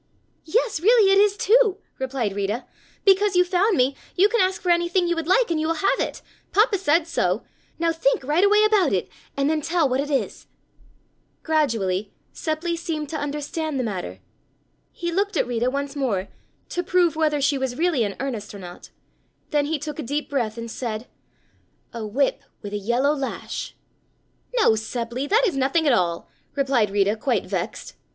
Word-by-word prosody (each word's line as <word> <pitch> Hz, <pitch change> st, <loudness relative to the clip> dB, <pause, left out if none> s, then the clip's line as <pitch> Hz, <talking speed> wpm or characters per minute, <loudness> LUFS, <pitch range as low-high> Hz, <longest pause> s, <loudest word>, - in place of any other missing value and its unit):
"Yes, 435 Hz, +2 st, 0 dB
really, 425 Hz, +2 st, +5 dB
it 390 Hz, -, +5 dB
is, 410 Hz, 0 st, +3 dB
too," 435 Hz, -2 st, +4 dB, 0.2 s
replied 255 Hz, -6 st, -2 dB
Rita, 205 Hz, +5 st, -2 dB, 0.4 s
"because 395 Hz, 0 st, +4 dB
you 360 Hz, 0 st, +5 dB
found 370 Hz, +2 st, +2 dB
me 260 Hz, +2 st, +2 dB, 0.2 s
you 395 Hz, +3 st, +5 dB
can 470 Hz, -1 st, +2 dB
ask 375 Hz, 0 st, +1 dB
for 360 Hz, -, +1 dB
anything 345 Hz, +1 st, +2 dB
you 345 Hz, -, +1 dB
would 330 Hz, -1 st, -3 dB
like, 450 Hz, +3 st, +3 dB
and 320 Hz, -, +1 dB
you 315 Hz, -, 0 dB
will 330 Hz, -, 0 dB
have 390 Hz, +5 st, +1 dB
it. -, -, -3 dB, 0.3 s
Papa 420 Hz, -1 st, +3 dB
said 325 Hz, -2 st, +2 dB
so. 330 Hz, -, 0 dB, 0.3 s
Now 335 Hz, 0 st, +1 dB
think 315 Hz, -5 st, +1 dB
right 300 Hz, +7 st, +2 dB
away 420 Hz, +1 st, +5 dB
about 415 Hz, -, +3 dB
it 185 Hz, -, -1 dB, 0.3 s
and 275 Hz, 0 st, +1 dB
then 310 Hz, 0 st, +1 dB
tell 330 Hz, 0 st, +1 dB
what 255 Hz, 0 st, 0 dB
it 290 Hz, +1 st, -2 dB
is." 275 Hz, -2 st, -2 dB, 1.0 s
Gradually 220 Hz, -, 0 dB, 0.2 s
Seppli 330 Hz, +2 st, -2 dB
seemed 325 Hz, -3 st, -4 dB
to 320 Hz, -, -5 dB
understand 295 Hz, 0 st, -3 dB
the -, -, 0 dB
matter. 200 Hz, -6 st, -5 dB, 0.7 s
He 345 Hz, 0 st, -4 dB
looked 400 Hz, +1 st, 0 dB
at -, -, +2 dB
Rita 245 Hz, 0 st, 0 dB
once 280 Hz, +1 st, -3 dB
more 215 Hz, -9 st, -1 dB, 0.4 s
to 355 Hz, -, -1 dB
prove 355 Hz, -2 st, +2 dB
whether 310 Hz, -2 st, +1 dB
she 280 Hz, 0 st, +1 dB
was 260 Hz, -1 st, -3 dB
really 325 Hz, -7 st, +2 dB
in 200 Hz, -2 st, -3 dB
earnest 235 Hz, -6 st, -4 dB
or -, -, -8 dB
not, 175 Hz, -1 st, -10 dB, 0.6 s
then 295 Hz, -2 st, +1 dB
he 315 Hz, +1 st, 0 dB
took 295 Hz, +1 st, -6 dB
a -, -, -1 dB
deep 290 Hz, +4 st, -3 dB
breath 235 Hz, -5 st, -1 dB
and 230 Hz, 0 st, -6 dB
said: 225 Hz, -2 st, -4 dB, 0.9 s
"A 230 Hz, -1 st, -5 dB
whip 270 Hz, +5 st, 0 dB, 0.2 s
with 205 Hz, 0 st, -6 dB
a -, -, 0 dB
yellow 240 Hz, +8 st, +1 dB
lash." 275 Hz, -3 st, -5 dB, 0.8 s
"No, 455 Hz, -, +5 dB
Seppli, 235 Hz, +4 st, -3 dB
that 455 Hz, +5 st, +4 dB
is 375 Hz, -, 0 dB
nothing 275 Hz, +5 st, +1 dB
at 280 Hz, -, +4 dB
all," 170 Hz, -5 st, 0 dB, 0.3 s
replied 265 Hz, -6 st, +2 dB
Rita 200 Hz, +1 st, +2 dB
quite 230 Hz, -1 st, -1 dB
vexed. 185 Hz, -3 st, -4 dB
295 Hz, 185 wpm, -23 LUFS, 240-350 Hz, 1.0 s, really